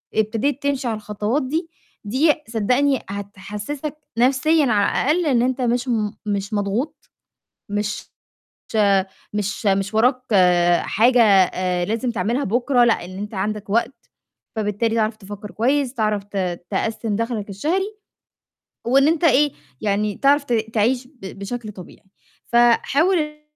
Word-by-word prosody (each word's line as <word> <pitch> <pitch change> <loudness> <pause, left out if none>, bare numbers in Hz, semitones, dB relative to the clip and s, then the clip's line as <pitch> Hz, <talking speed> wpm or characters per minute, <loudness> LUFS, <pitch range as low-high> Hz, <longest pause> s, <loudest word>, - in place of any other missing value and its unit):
ابتديت 230 +6 0
تمشي 275 -3 -1
على 225 - -1
الخطوات 210 +6 -2
دي 325 +6 -2 0.4
دي 270 +9 +3 0.2
صدّقني 250 +5 +1
هتحسِّسك 205 +9 -6 0.2
نَفْسيًا 275 +5 +3
على 215 +5 +2
الأقل 345 +1 +1
إن 250 -5 +3
أنت 255 +1 0
مش 245 +1 0
م 215 -4 0
مش 200 0 -2
مضغوط، 235 +9 -3 0.6
مش 205 0 -3 1.2
مش 210 +1 -3
مش 195 +1 +1
وراك 250 +3 +3 0.6
حاجة 240 +3 +3
آآ 185 -3 +3
لازم 230 +4 -1
تعملها 235 +5 -1
بُكرة، 245 +3 +2
لأ، 225 -7 +2
إن 185 +1 -9
أنت 210 +2 -6
عندَك 205 +1 -3
وقت، 235 +3 -1 0.5
فبالتالي 220 +2 0
تعرف 215 0 +1
تفكَّر 205 +1 -9
كويس، 265 +3 0
تعرف 215 -4 0
ت 200 - -4 0.3
تقسِّم 220 +1 -1
دخْلَك 230 -3 -3
الشهري 375 - -2 0.9
وإن 270 +4 +4
أنت 330 +1 +1
إيه، 290 -1 +4 0.3
يعني 205 0 0
تعرف 280 +1 +3
ت 245 - -4 0.2
تعيش 245 +4 +1
ب 210 -9 -11
بشكل 215 +1 -5
طبيعي. 185 0 -13 0.4
فحاول 260 +9 +3
إن 300 0 -4
230 Hz, 130 wpm, -21 LUFS, 205-270 Hz, 1.2 s, وإن